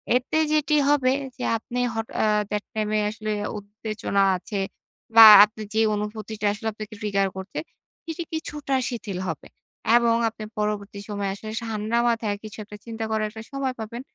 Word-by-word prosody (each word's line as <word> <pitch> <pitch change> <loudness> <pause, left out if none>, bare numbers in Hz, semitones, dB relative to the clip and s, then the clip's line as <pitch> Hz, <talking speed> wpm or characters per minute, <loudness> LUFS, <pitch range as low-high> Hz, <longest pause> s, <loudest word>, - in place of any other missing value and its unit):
এতে 255 +5 0 0.2
যেটি 305 0 +2
হবে 270 -3 +3 0.3
যে 250 - -5
আপনি 240 +2 -5 0.2
হঠাৎ 225 0 -4
এ - - +3 0.3
that 210 0 -1
time 215 -1 -1
এ - - +2
আসলে 215 0 -4 0.3
উত্তেজনা 205 -1 -2
আছে 200 +3 -5 0.6
বা, 225 -1 +12 0.2
আপনি 215 +1 -12
যে 220 - +1 0.2
অনুভূতিটা 210 +1 -4
আসলে 215 +2 -5
আপনাকে 215 0 -8
trigger 200 -2 +1
করছে 190 +1 -5 0.5
এটি 340 +2 -4
কিছুটা 295 -3 -3
শিথিল 215 -7 -5
হবে 160 - -6 0.5
এবং 235 -1 +3
আপনি 220 -1 -10 0.2
পরবর্তী 210 -1 -2
সময়ে 200 -1 -2
আসলে 215 +2 -8
সা - - -6
ঠান্ডা 215 +2 -1
মাথায় 225 -3 0
কিছু 215 -1 -9
একটা 210 0 -11
চিন্তা 225 -1 -5
করার 215 -1 0
একটা 220 0 -9
সময় 275 -2 -1
পাবেন। 225 +2 -6
215 Hz, 170 wpm, -24 LUFS, 210-235 Hz, 0.6 s, বা